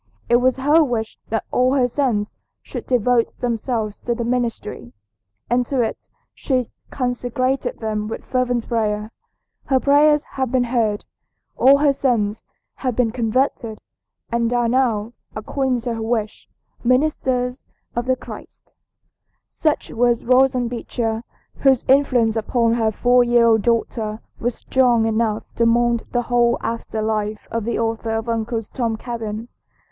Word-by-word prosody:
It 240 Hz, -, +6 dB
was 255 Hz, +1 st, +2 dB
her 295 Hz, +5 st, +4 dB
wish 230 Hz, -5 st, -3 dB
that 225 Hz, -1 st, -1 dB
all 255 Hz, +2 st, +2 dB
her 255 Hz, -3 st, +3 dB
sons 235 Hz, -6 st, -1 dB, 0.3 s
should -, -, -7 dB
devote 245 Hz, -1 st, +2 dB
themselves 230 Hz, -3 st, -2 dB
to 240 Hz, -, -2 dB
the 235 Hz, -, -3 dB
ministry, 235 Hz, -, -3 dB, 0.5 s
and 245 Hz, +1 st, +2 dB
to 265 Hz, -4 st, +1 dB
it 225 Hz, -, -5 dB, 0.3 s
she 255 Hz, -4 st, -1 dB, 0.2 s
consecrated 250 Hz, +1 st, -1 dB
them 215 Hz, -1 st, -3 dB
with 225 Hz, -, -6 dB
fervent 250 Hz, -2 st, 0 dB
prayer. 215 Hz, -2 st, -1 dB, 0.5 s
Her 265 Hz, -2 st, +2 dB
prayers 295 Hz, +2 st, +4 dB
have 260 Hz, -3 st, -3 dB
been 255 Hz, -1 st, +2 dB
heard. 230 Hz, -4 st, 0 dB, 0.5 s
All 275 Hz, +2 st, +6 dB
her 285 Hz, -1 st, +3 dB
sons 225 Hz, -6 st, 0 dB, 0.4 s
have 255 Hz, -3 st, -2 dB
been 240 Hz, -3 st, +2 dB
converted 230 Hz, -1 st, -1 dB, 0.5 s
and 235 Hz, 0 st, +1 dB
are 240 Hz, -1 st, +2 dB
now, 235 Hz, -3 st, +1 dB, 0.2 s
according 255 Hz, +3 st, -1 dB
to 240 Hz, 0 st, -2 dB
her 225 Hz, -, -4 dB
wish, 220 Hz, -1 st, -2 dB, 0.3 s
ministers 255 Hz, -1 st, +1 dB, 0.3 s
of 240 Hz, +2 st, -2 dB
Christ." -, -, -12 dB, 0.8 s
Such 310 Hz, -2 st, -1 dB
was 240 Hz, 0 st, +1 dB
Roxanna 255 Hz, 0 st, +3 dB
Beecher, 230 Hz, -1 st, -3 dB, 0.4 s
whose 265 Hz, -3 st, +3 dB
influence 255 Hz, -5 st, +3 dB
upon 230 Hz, +1 st, +1 dB
her 225 Hz, -2 st, +1 dB
four 245 Hz, +3 st, +4 dB
year 240 Hz, -1 st, +4 dB
old 225 Hz, -2 st, +4 dB
daughter 225 Hz, -1 st, -1 dB, 0.2 s
was 240 Hz, 0 st, -1 dB
strong 245 Hz, -4 st, +2 dB
enough 220 Hz, -1 st, 0 dB
to 230 Hz, -, +3 dB
mould 235 Hz, 0 st, +2 dB
the 245 Hz, 0 st, 0 dB
whole 240 Hz, 0 st, +2 dB
after 230 Hz, -1 st, -3 dB
life 215 Hz, -1 st, -2 dB
of 230 Hz, -2 st, -2 dB
the 235 Hz, -, -1 dB
author 225 Hz, 0 st, -2 dB
of 225 Hz, +1 st, -4 dB
"Uncle 225 Hz, 0 st, -1 dB
Tom's 225 Hz, +1 st, -3 dB
Cabin." 225 Hz, -2 st, -5 dB
240 Hz, 145 wpm, -21 LUFS, 225-255 Hz, 0.8 s, It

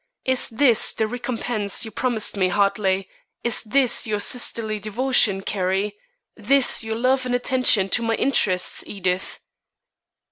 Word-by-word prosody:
Is 260 Hz, -1 st, +1 dB
this 235 Hz, 0 st, +3 dB
the 220 Hz, -, 0 dB
recompense 235 Hz, -2 st, -2 dB
you 220 Hz, -, -8 dB
promised 230 Hz, -1 st, -1 dB
me, 190 Hz, -2 st, +2 dB
Hartley? 195 Hz, -1 st, +1 dB, 0.4 s
this 240 Hz, +2 st, +1 dB
your 210 Hz, -1 st, -1 dB
sisterly 220 Hz, -2 st, -2 dB
devotion, 215 Hz, -2 st, +1 dB
Carrie? 195 Hz, +1 st, -1 dB, 0.4 s
this 275 Hz, -3 st, +2 dB
your 220 Hz, 0 st, -3 dB
love 255 Hz, +3 st, +1 dB
and 245 Hz, -, 0 dB
attention 245 Hz, -5 st, +2 dB
to 240 Hz, -, +2 dB
my 225 Hz, -1 st, 0 dB
interests, 190 Hz, -8 st, +1 dB
Edith?" 185 Hz, -2 st, -3 dB
220 Hz, 130 wpm, -22 LUFS, 200-245 Hz, 0.4 s, this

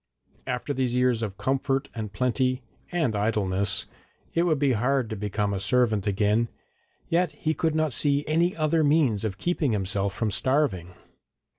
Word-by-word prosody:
After 125 Hz, +3 st, -2 dB
these 130 Hz, -2 st, -1 dB
years 125 Hz, -2 st, +2 dB
of 100 Hz, -4 st, -4 dB
comfort 135 Hz, +4 st, 0 dB
and 110 Hz, -3 st, -5 dB
plenty 130 Hz, +3 st, 0 dB, 0.3 s
and 155 Hz, -11 st, 0 dB
idleness 100 Hz, -2 st, 0 dB, 0.5 s
it 170 Hz, +1 st, +2 dB
would 155 Hz, -3 st, +2 dB
be 140 Hz, -1 st, +2 dB
hard 125 Hz, +1 st, +1 dB
to -, -, -2 dB
become 105 Hz, 0 st, -2 dB
a 95 Hz, -, -2 dB
servant 110 Hz, -2 st, +2 dB
again, 105 Hz, +3 st, +2 dB, 0.6 s
yet 170 Hz, -2 st, +1 dB
he 155 Hz, +1 st, -1 dB
could 160 Hz, -1 st, 0 dB
not 155 Hz, -4 st, +1 dB
see 140 Hz, +3 st, +1 dB
any 170 Hz, +4 st, +1 dB
other 155 Hz, 0 st, +2 dB
means 145 Hz, -9 st, +2 dB
of 100 Hz, -3 st, -3 dB
keeping 155 Hz, -, 0 dB
himself 100 Hz, -1 st, -1 dB
from 110 Hz, -3 st, -1 dB
starving. 95 Hz, -, 0 dB
125 Hz, 160 wpm, -26 LUFS, 105-145 Hz, 0.6 s, years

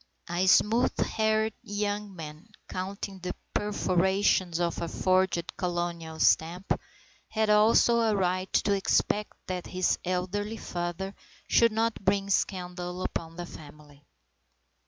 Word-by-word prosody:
A 180 Hz, +2 st, +1 dB
smooth 220 Hz, +5 st, +4 dB
haired 220 Hz, 0 st, +1 dB
young 205 Hz, -1 st, -3 dB
man 155 Hz, +3 st, -9 dB, 0.2 s
(counting 195 Hz, +1 st, -5 dB
the 180 Hz, 0 st, -4 dB, 0.2 s
perforations 190 Hz, -3 st, +1 dB
of 170 Hz, -1 st, -1 dB
a 170 Hz, -, -2 dB
forged 185 Hz, -1 st, +1 dB
colonial 175 Hz, -3 st, -3 dB
stamp) 175 Hz, +4 st, +2 dB, 0.6 s
had 220 Hz, -1 st, +1 dB
also 225 Hz, +2 st, +5 dB
a 225 Hz, -2 st, +2 dB
right 185 Hz, -1 st, 0 dB
to 205 Hz, -, +2 dB
expect 205 Hz, +1 st, +1 dB
that 180 Hz, -1 st, -4 dB
his 185 Hz, 0 st, 0 dB
elderly 185 Hz, +4 st, -2 dB
father 175 Hz, +2 st, -4 dB, 0.3 s
should 230 Hz, -1 st, +5 dB
not 225 Hz, -1 st, -1 dB
bring 195 Hz, +1 st, +1 dB
scandal 180 Hz, -1 st, -2 dB
upon 165 Hz, 0 st, -4 dB
the 175 Hz, 0 st, -5 dB
family. 145 Hz, -2 st, -13 dB
185 Hz, 120 wpm, -28 LUFS, 175-205 Hz, 0.6 s, also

